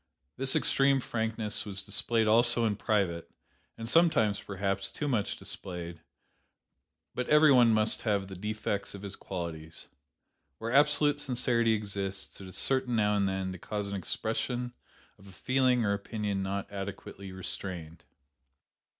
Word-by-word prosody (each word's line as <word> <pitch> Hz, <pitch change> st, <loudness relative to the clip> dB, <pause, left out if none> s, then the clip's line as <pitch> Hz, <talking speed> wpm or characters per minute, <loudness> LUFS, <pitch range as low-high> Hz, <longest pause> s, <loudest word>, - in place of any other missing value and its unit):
This 135 Hz, 0 st, 0 dB
extreme 135 Hz, 0 st, +3 dB
frankness 110 Hz, -3 st, -1 dB
was 100 Hz, -1 st, -6 dB
displayed 110 Hz, +2 st, +1 dB
also 115 Hz, +2 st, +4 dB
in 105 Hz, -2 st, +1 dB
private, 95 Hz, -6 st, 0 dB, 0.5 s
and 115 Hz, -, -6 dB
sometimes, 115 Hz, -9 st, +3 dB
perhaps, 100 Hz, 0 st, -3 dB
too 150 Hz, -, -3 dB
much 115 Hz, -7 st, 0 dB
displayed; 85 Hz, -2 st, -6 dB, 1.1 s
but 125 Hz, -, -3 dB
every 150 Hz, 0 st, +7 dB
one 120 Hz, -3 st, +6 dB
must 110 Hz, 0 st, +2 dB
have 100 Hz, -3 st, 0 dB
the 95 Hz, -, -8 dB
defects 105 Hz, +1 st, -3 dB
of 100 Hz, -, -10 dB
his 100 Hz, -, -5 dB
qualities. 80 Hz, -3 st, -7 dB, 0.7 s
Where 115 Hz, +2 st, -4 dB
absolute 145 Hz, 0 st, +4 dB
sincerity 120 Hz, -4 st, +2 dB
exists, 100 Hz, -2 st, -4 dB
it 95 Hz, -, -9 dB
is 95 Hz, -, -7 dB
certain 130 Hz, -2 st, +1 dB
now 105 Hz, -1 st, +2 dB
and 100 Hz, -1 st, +2 dB
then 95 Hz, -1 st, -2 dB
to 95 Hz, -, -8 dB
cause 105 Hz, +2 st, -4 dB
an 100 Hz, -, -3 dB
expression 120 Hz, +5 st, -2 dB, 0.5 s
of 95 Hz, -, -16 dB
a -, -, -12 dB
feeling 130 Hz, +3 st, +2 dB
or 100 Hz, -, +2 dB
opinion 100 Hz, -1 st, -3 dB
not 100 Hz, +1 st, -3 dB
adequately 100 Hz, -1 st, -7 dB
restrained. 90 Hz, -3 st, -4 dB
105 Hz, 145 wpm, -30 LUFS, 95-120 Hz, 1.1 s, every